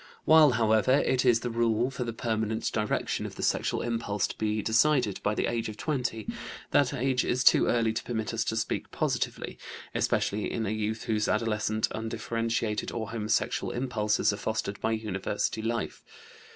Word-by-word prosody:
While, 155 -4 +7
however, 110 +2 +3
it 130 0 +2
is 120 -2 +4
the 120 - -3
rule 115 +2 +1
for 125 - -3
the 120 - -3
permanent 110 -1 -1
direction 105 -1 -1
of - - -10
the - - -5
sexual - - 0
impulse 115 -4 -1
to - - -6
be 110 -1 0
decided 115 -2 +2
by 105 - 0
the - - 0
age 115 -1 -1
of 110 - -8
20, 125 -7 -2 0.4
that 140 -4 +3
age 130 -1 +1
is 125 +1 0
too - - +6
early 115 -2 +2
to - - -2
permit 110 -2 -3
us 115 - 0
to 110 - -1
speak 115 - -2
positively, - - -2 0.3
especially 105 +1 0
in 115 - -2
a 100 - -1
youth 110 +1 -2
whose 105 -2 0
adolescent 110 0 0
undifferentiated 115 0 -2
or 115 -1 -4
homosexual 110 -2 0
impulses 110 -5 +1
are - - -4
fostered 110 -2 -3
by 110 - +1
university 105 0 -2
life. 115 +1 -3
110 Hz, 175 wpm, -28 LUFS, 110-120 Hz, 0.4 s, While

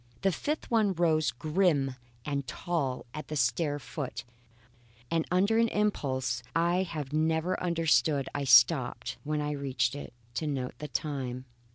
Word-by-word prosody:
A 195 - +4
fifth 295 - -3
one 215 -4 +3
rose 160 -3 +2
grim 155 -5 +1 0.3
and 140 -2 -2
tall 135 -1 -2
at 150 - -6
the 155 - -4
stair 145 +3 +1
foot, 140 0 -5 0.9
and 165 -1 +1
under 200 +5 +3
an 230 - +4
impulse 130 - 0
I 170 +2 +3
have 155 -6 -4
never 160 +3 +1
understood 160 -4 +2
I 145 -1 -2
stopped, 125 0 +4
when 150 0 -1
I 150 0 -1
reached 140 -2 0
it, 145 -4 -8 0.2
to 155 +5 -2
note 130 -3 -2
the 150 - -5
time. 130 -5 -3
150 Hz, 150 wpm, -29 LUFS, 135-170 Hz, 0.9 s, A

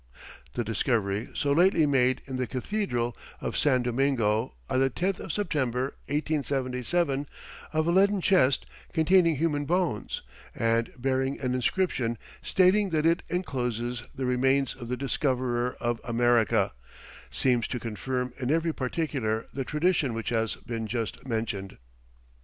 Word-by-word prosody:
The 120 - 0
discovery 110 -1 0
so 140 - +1
lately 170 +1 +5
made 130 -3 +2
in 130 -2 -4
the 130 -1 -1
cathedral 125 - -2 0.2
of - - -4
San 130 -4 +3
Domingo, 120 -3 +1
on 130 -1 +1
the 135 0 +3
10th 185 +8 -1
of - - -5
September, 135 - -1
1877, 140 0 0 0.4
of 155 0 +1
a 170 - +2
leaden 200 +2 +4
chest 170 -8 +3 0.3
containing 170 0 +4
human 145 -1 0
bones, 170 - -1 0.3
and 115 0 +1
bearing 130 +1 0
an 125 -2 -1
inscription 125 -3 0 0.2
stating 190 +2 +3
that 155 -2 +1
it 165 +1 +3
encloses 125 - -2
the 130 - -2
remains 130 +2 +2
of 125 -3 -9
the 125 - -1
Discoverer 125 -3 0
of 120 -1 -1
America, 120 -2 +2 0.6
seems 125 -3 +1
to 125 - -3
confirm 125 +3 -3
in 125 -1 -2
every 165 +1 +2
particular 130 -6 -1
the 135 - -2
tradition 150 -3 +1
which 115 - -3
has 115 -1 0
been 115 -2 -5
just 115 +3 -4
mentioned. 110 -5 -3
130 Hz, 140 wpm, -28 LUFS, 120-155 Hz, 0.6 s, lately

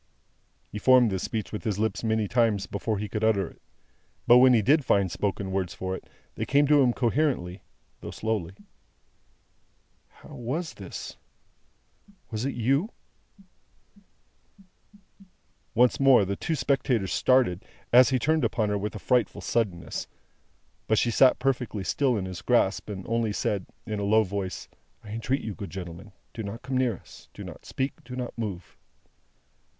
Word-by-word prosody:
He 105 - -5
formed 125 -1 +5
this 95 -1 -2
speech 110 -7 -3
with 105 - -5
his 105 -5 -1
lips 110 +2 -1
many 110 -1 +1
times 115 -3 +2
before 105 +1 -2
he 105 +1 -3
could 105 +2 -4
utter 100 -5 +2
it. - - -16 0.6
But 120 +1 +8
when 130 0 +7
he 110 - +3
did 145 +6 +4
find 100 -6 +2
spoken 100 +1 -2
words 95 -2 -2
for 95 0 -3
it, - - -11 0.2
they - - -4
came 145 +2 +4
to 150 -1 +6
him 125 -2 +4
coherently, 120 - 0 0.4
though - - -7
slowly. 105 -5 -3 1.5
"How - - -18
was 145 +8 -4
this? 95 -2 -8 1.1
Was 110 +2 -2
it 140 - -2
you?" 135 - +1 2.9
Once 125 +1 +4
more, 135 -6 +6
the 100 +1 -2
two 160 - -2
spectators 125 - 0
started, 125 -9 +2 0.3
as 125 0 +8
he 130 - +2
turned 155 +5 +1
upon 110 -3 0
her 105 0 0
with 105 +2 -4
a - - -3
frightful 120 0 0
suddenness. 100 -7 -2 0.8
But 110 - +2
she 120 - +2
sat 130 +3 +5
perfectly 125 -6 -1
still 125 - +1
in 95 - -3
his 90 -2 -6
grasp, 110 -5 +1
and 95 -3 -6
only 115 -2 0
said, 100 -2 -2 0.2
in 110 -2 -3
a - - -2
low 110 +2 +4
voice, 100 -1 -4 0.4
"I - - -11
entreat 115 +5 -1
you, 110 - -4
good 100 -4 -7
gentlemen, 90 +3 -8 0.2
do 115 - -6
not 105 +3 -6
come 130 0 -3
near 125 -6 +1
us, - - -16
do - - -8
not - - -10
speak, 135 +1 -3
do 125 +1 -8
not 125 -1 -5
move!" 100 -6 -5
110 Hz, 165 wpm, -27 LUFS, 100-125 Hz, 2.9 s, But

